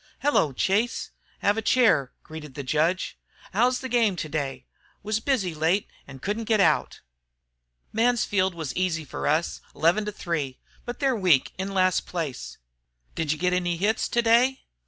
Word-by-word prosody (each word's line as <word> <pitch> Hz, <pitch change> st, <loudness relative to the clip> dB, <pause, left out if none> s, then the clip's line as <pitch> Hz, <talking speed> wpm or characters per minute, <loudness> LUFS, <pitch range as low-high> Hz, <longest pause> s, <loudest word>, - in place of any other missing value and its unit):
"Hello, 280 Hz, -, +3 dB
Chase, 205 Hz, -, 0 dB, 0.3 s
have 205 Hz, +2 st, +3 dB
a -, -, -2 dB
chair," 220 Hz, -, +3 dB
greeted 150 Hz, -4 st, -10 dB
the 140 Hz, -, -5 dB
judge. 160 Hz, +7 st, 0 dB, 0.3 s
"How's 245 Hz, +5 st, +2 dB
the 260 Hz, -, -4 dB
game 230 Hz, -6 st, +2 dB
today? 140 Hz, -6 st, -4 dB, 0.4 s
Was 215 Hz, +1 st, 0 dB
busy 220 Hz, -8 st, 0 dB
late 165 Hz, +6 st, +1 dB, 0.2 s
and 135 Hz, -1 st, -12 dB
couldn't 215 Hz, +3 st, -2 dB
get 220 Hz, -1 st, +2 dB
out." 195 Hz, -, +2 dB, 0.9 s
"Mansfield 215 Hz, -5 st, +2 dB
was 160 Hz, -4 st, -5 dB
easy 170 Hz, -4 st, -1 dB
for -, -, -4 dB
us, 155 Hz, +3 st, 0 dB
11 175 Hz, +7 st, +2 dB
to 210 Hz, -, -3 dB
3. 155 Hz, -9 st, -3 dB, 0.3 s
But 240 Hz, +2 st, -6 dB
they're 270 Hz, -2 st, +2 dB
weak, 180 Hz, -, +3 dB
in 195 Hz, +1 st, -3 dB
last 185 Hz, -1 st, +2 dB
place." 160 Hz, -8 st, -5 dB, 0.6 s
"Did 160 Hz, -3 st, -1 dB
you 155 Hz, -, -1 dB
get 180 Hz, +3 st, +1 dB
any 175 Hz, -1 st, 0 dB
hits 210 Hz, +5 st, 0 dB
today?" 240 Hz, +3 st, +3 dB
185 Hz, 155 wpm, -25 LUFS, 155-225 Hz, 0.9 s, Hello